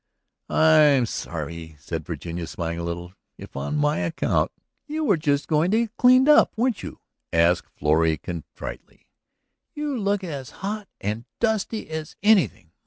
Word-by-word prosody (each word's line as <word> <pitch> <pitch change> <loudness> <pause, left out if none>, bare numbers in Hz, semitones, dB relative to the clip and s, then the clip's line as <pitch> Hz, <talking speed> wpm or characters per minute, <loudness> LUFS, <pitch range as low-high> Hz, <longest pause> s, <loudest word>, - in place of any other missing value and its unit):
"I 160 0 +5
am 140 -5 +5
sorry," 80 -4 -6
said 80 +1 -6
Virginia, 85 +1 -5
smiling 85 0 -4
a - - -4
little, 85 +1 -5 0.2
"if - - -12
on 70 - -2
my 150 +1 +1
account.. 165 0 0 0.2
." - - -53
"You 310 +1 -2
were 205 -10 +4
just 145 -3 0
going 160 +2 +2
to 220 +3 +3
get 230 0 -4
cleaned 255 +2 +6
up, 300 -5 +5
weren't 245 0 +1
you?" - - -8 0.3
asked 85 +1 +2
Florrie 80 +1 +2
contritely. 85 -3 -8 0.7
"You 295 -2 -2
look 200 -3 0
as 140 -8 -5 0.2
hot 210 0 -3
and 105 +4 -3
dusty 220 -1 -1
as 155 -1 -5
anything. 195 - +3
150 Hz, 160 wpm, -24 LUFS, -, 0.7 s, cleaned